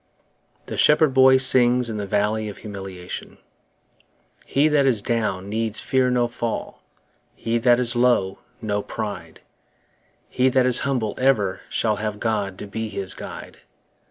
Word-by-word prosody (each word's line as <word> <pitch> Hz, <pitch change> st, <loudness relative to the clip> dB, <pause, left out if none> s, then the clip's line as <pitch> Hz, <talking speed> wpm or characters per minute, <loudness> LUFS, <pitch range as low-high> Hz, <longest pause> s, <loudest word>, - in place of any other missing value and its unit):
The -, -, -5 dB
Shepherd 150 Hz, -2 st, +4 dB
Boy 130 Hz, 0 st, +6 dB
sings 125 Hz, -1 st, +3 dB
in 110 Hz, -2 st, -4 dB
the 100 Hz, -1 st, -4 dB
Valley 105 Hz, +2 st, 0 dB
of 100 Hz, -, -9 dB
Humiliation 95 Hz, -4 st, -8 dB, 1.1 s
HE 140 Hz, +3 st, +2 dB
that 145 Hz, -2 st, +3 dB
is 120 Hz, -5 st, +3 dB
down 105 Hz, -5 st, -2 dB
needs 110 Hz, +1 st, -1 dB
fear 130 Hz, -1 st, +1 dB
no 125 Hz, -1 st, +1 dB
fall, 120 Hz, -1 st, -5 dB, 0.5 s
He 115 Hz, +1 st, -1 dB
that 120 Hz, 0 st, +4 dB
is 120 Hz, -1 st, +3 dB
low, 120 Hz, -6 st, +2 dB, 0.2 s
no 105 Hz, -1 st, -1 dB
pride; 105 Hz, 0 st, -7 dB, 0.9 s
He 130 Hz, +1 st, +1 dB
that 130 Hz, 0 st, +2 dB
is 125 Hz, -1 st, +4 dB
humble 125 Hz, -6 st, -1 dB
ever 115 Hz, -8 st, +1 dB
shall 110 Hz, -2 st, 0 dB
Have 105 Hz, 0 st, -4 dB
God 105 Hz, -4 st, -2 dB
to -, -, -7 dB
be 110 Hz, +2 st, -5 dB
his 100 Hz, -2 st, -3 dB
guide. -, -, -10 dB
115 Hz, 150 wpm, -22 LUFS, 105-125 Hz, 1.1 s, Boy